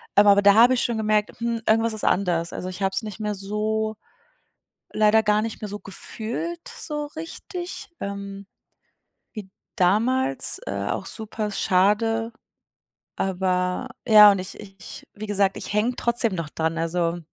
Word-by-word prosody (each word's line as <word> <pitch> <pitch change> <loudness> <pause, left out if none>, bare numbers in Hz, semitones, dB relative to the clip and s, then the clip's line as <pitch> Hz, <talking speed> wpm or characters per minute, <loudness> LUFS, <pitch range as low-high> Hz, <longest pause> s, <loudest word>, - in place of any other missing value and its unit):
aber 205 0 +6
da 200 0 +6
habe 235 +4 +6
ich 250 - +1
schon 235 -2 -1
gemerkt: 215 -1 0
„Hm, 235 -1 -2
irgendwas 225 +1 +3
ist 215 - -7
anders.“ 175 -3 +1
Also, 180 - -5
ich 185 +2 -8
habe 195 - +1
es - - 0
nicht 215 0 -7
mehr 210 -1 -2
so 215 +2 -2 1.0
leider 215 +1 +4
gar 210 0 +2
nicht 225 -1 -5
mehr 210 - -4
so 205 - -6
gefühlt, 240 - -5
so 295 -1 -5
richtig, 350 +4 -7
ähm, 200 0 -6 0.9
wie 205 -4 -9 0.2
damals, 215 - +2
äh, 100 0 -3
auch - - -3
super 215 -1 -2
schade. 215 +4 +1 0.8
Aber 185 +4 -1 0.2
ja 210 -2 +9
und 195 - -1
ich 185 +1 -7
ich 195 -2 -11
wie 215 - -7
gesagt, 200 -1 +1
ich - - -6
hänge 225 +4 +1
trotzdem 235 -5 0
noch 165 -3 -4
dran, 160 +1 -2
also 170 +1 -1
210 Hz, 155 wpm, -24 LUFS, 190-225 Hz, 1.0 s, ja